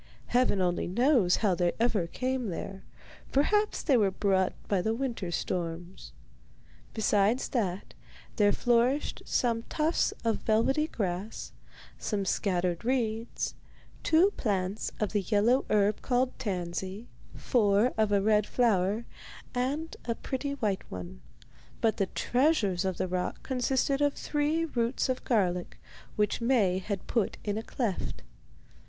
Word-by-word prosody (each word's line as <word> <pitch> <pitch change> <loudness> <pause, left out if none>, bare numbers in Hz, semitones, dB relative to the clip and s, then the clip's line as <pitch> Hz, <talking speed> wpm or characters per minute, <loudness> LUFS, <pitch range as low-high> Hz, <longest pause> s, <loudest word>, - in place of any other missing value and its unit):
Heaven 245 -5 +2
only 175 -1 0
knows 230 -1 +3
how 195 - +4
they 175 0 +1
ever 220 -7 +1
came 255 +4 -2
there; 190 +2 -5 0.5
perhaps 415 +10 +2
they 280 - +3
were 205 -4 +3
brought 190 -1 +1
by 195 -3 +1
the 220 +4 0
winter 235 -8 -3
storms. 175 +1 -4 0.8
Besides 215 +2 +2
that, 195 -7 -2 0.4
there 205 -2 +5
flourished 245 +5 +1
some 230 -2 +1
tufts 315 +2 +1
of 225 -1 +2
velvety 265 +8 +2
grass, 195 - -4 0.5
some 200 -3 -2
scattered 180 -2 0
reeds, 230 -2 -1 0.5
two 340 +5 +4
plants 195 -2 -1
of 210 - 0
the 205 - +1
yellow 220 +7 +2
herb 210 0 +2
called 255 0 0
tansy, 190 +2 -4 0.3
four 215 0 +2
of 215 -1 +1
a 200 -1 +3
red 210 -1 +3
flower, 215 -2 +1 0.5
and 280 +6 -2
a 230 - -1
pretty 280 +3 -3
white 210 -8 -1
one; 85 -9 -8 0.6
but 220 -2 +1
the 195 - +1
treasures 230 - +1
of 190 -2 -1
the - - -1
rock 180 0 -3
consisted 265 +2 0
of 290 -1 +2
three 300 +2 0
roots 240 -4 -1
of 255 - -1
garlic, 180 -7 0 0.4
which 210 +2 0
Maie 220 -7 +3
had 195 0 -4
put 230 -5 0
in 205 -1 -1
a 220 - -2
cleft. 225 -4 -3
215 Hz, 135 wpm, -29 LUFS, 190-255 Hz, 0.8 s, there